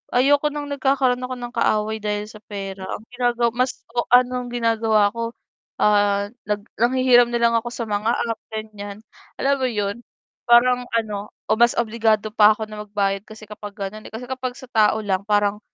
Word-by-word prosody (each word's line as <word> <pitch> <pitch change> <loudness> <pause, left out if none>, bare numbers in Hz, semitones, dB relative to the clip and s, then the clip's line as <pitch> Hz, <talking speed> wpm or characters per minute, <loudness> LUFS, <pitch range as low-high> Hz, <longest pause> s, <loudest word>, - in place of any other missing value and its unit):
ayoko 285 +4 +4
ng 295 0 -5
nagkakaroon 265 -2 +1
ako 255 0 -4
ng 240 0 -7
kaaway 215 +1 +1
dahil 210 0 -2
sa 215 - -12
pera. 195 -2 -7
Ang 215 - -6
ginagawa 240 -1 +1
mas 250 +1 -1
o 240 - +1
anong 250 0 +3
ginagawa 225 -3 +2
ko, 230 0 -3 0.5
ah, 205 -1 +3 0.2
nag 210 0 0 0.2
nanghihiram 245 -1 +5
na 240 - 0
lang 230 0 +4
ako 240 +1 -3
sa 230 - -4
mga 210 +2 0
app, 230 -1 -2
ganyan. 215 -1 -7 0.4
Alam 280 +1 +3
mo 255 - +2
yun, 205 -2 -2 0.5
parang 250 +1 +6 0.2
ano 210 -2 -3 0.2
o - - +5
mas 235 0 +5
obligado 220 -2 +1
pa 215 -1 +6
ako 220 - -4
na 210 0 -7
magbayad 195 -1 0
kasi 215 0 -12
kapag 205 -1 -9
ganon, 200 +2 -6
eh. - - -13
Kasi 240 +3 -6
kapag 255 -1 -4
sa 260 - -10
tao 215 -1 +4
lang 190 -2 0
parang 205 0 +2
225 Hz, 185 wpm, -22 LUFS, 210-245 Hz, 0.5 s, parang